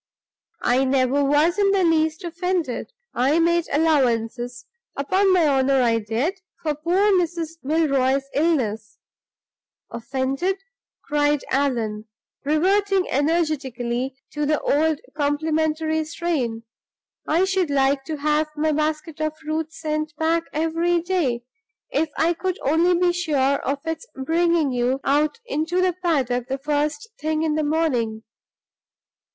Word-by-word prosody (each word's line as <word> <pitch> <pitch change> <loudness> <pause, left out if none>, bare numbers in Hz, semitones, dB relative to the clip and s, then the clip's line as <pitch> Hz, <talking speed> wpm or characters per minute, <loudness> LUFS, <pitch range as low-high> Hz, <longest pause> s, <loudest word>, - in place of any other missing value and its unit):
"I 250 +2 +3
never 265 +1 +2
was 300 +7 +2
in 400 -1 +4
the 395 -1 +3
least 320 0 +1
offended; 345 -4 -2 0.2
I 265 +6 +2
made 340 0 +2
allowances 245 -5 +1 0.3
upon 375 +8 +2
my 360 -3 +4
honor 270 -1 +3
I 230 -1 +2
did 245 - -2 0.2
for 305 -2 0
poor 355 +8 +2
Mrs. 335 -3 0
Milroy's 275 -3 +2
illness. 240 -9 0 0.9
Offended!" 270 - -2 0.5
cried 295 -1 +1
Allan, 230 -6 0 0.4
reverting 380 +6 +2
energetically 270 -5 -1 0.2
to 295 -1 -2
the 300 0 +2
old 310 +1 +1
complimentary 315 +1 0
strain. 295 -9 -2 0.6
"I 330 +4 +3
should 380 -4 0
like 275 0 +2
to 315 -2 -4
have 300 +1 +1
my 310 +1 +1
basket 305 +1 -2
of 310 0 -2
fruit 315 0 -3
sent 310 -1 -3
back 330 +2 +1
every 330 +3 +1
day 325 -9 -1 0.5
if 320 - 0
I 335 +2 +3
could 370 +2 -3
only 330 +5 +3
be 355 -1 +3
sure 345 -4 -1 0.2
of 280 +2 -3
its 325 +8 -4
bringing 325 +1 +1
you 250 +2 0
out 295 +7 +1
into 335 -4 -1
the 365 -1 +2
paddock 270 -9 0
the 270 0 -2
first 300 +9 -1
thing 310 0 -1
in 315 -1 +1
the 310 0 0
morning." 255 -8 0
305 Hz, 130 wpm, -23 LUFS, 270-335 Hz, 0.9 s, in